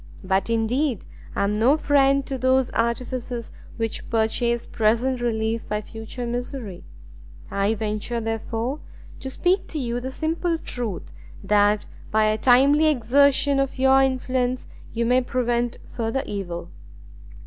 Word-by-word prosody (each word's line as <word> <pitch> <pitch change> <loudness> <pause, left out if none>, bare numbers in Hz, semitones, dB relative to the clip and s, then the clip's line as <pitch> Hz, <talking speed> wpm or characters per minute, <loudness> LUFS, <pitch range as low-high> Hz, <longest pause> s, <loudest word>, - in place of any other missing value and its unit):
But 190 +2 0
indeed 230 +2 0 0.3
I - - +1
am 200 +1 +1
no 240 +8 +4
friend 275 -2 +3
to 270 -2 -4
those 260 0 +2
artifices 235 0 -2 0.3
which 225 -1 -3
purchase 235 +1 +1
present 235 +4 +1
relief 225 -1 -1
by 210 0 -1
future 225 +3 -7
misery: 240 -5 -5 0.7
I 200 +2 +1
venture, 215 +2 -2
therefore, 225 +4 -3 0.4
to 265 - -5
speak 360 +7 +1
to 315 - -6
you 240 -3 -2
the 255 +2 -5
simple 330 +4 -1
truth, 240 - -5 0.3
that 205 +1 +3 0.2
by 220 0 +3
a 215 0 +2
timely 275 +6 +5
exertion 280 +1 +3
of 275 -1 -1
your 265 +1 +5
influence 255 -1 0 0.2
you 235 0 -1
may 250 +2 +4
prevent 240 -1 -1 0.2
further 230 +3 -1
evil." 175 -4 -5
240 Hz, 135 wpm, -24 LUFS, 220-265 Hz, 0.7 s, timely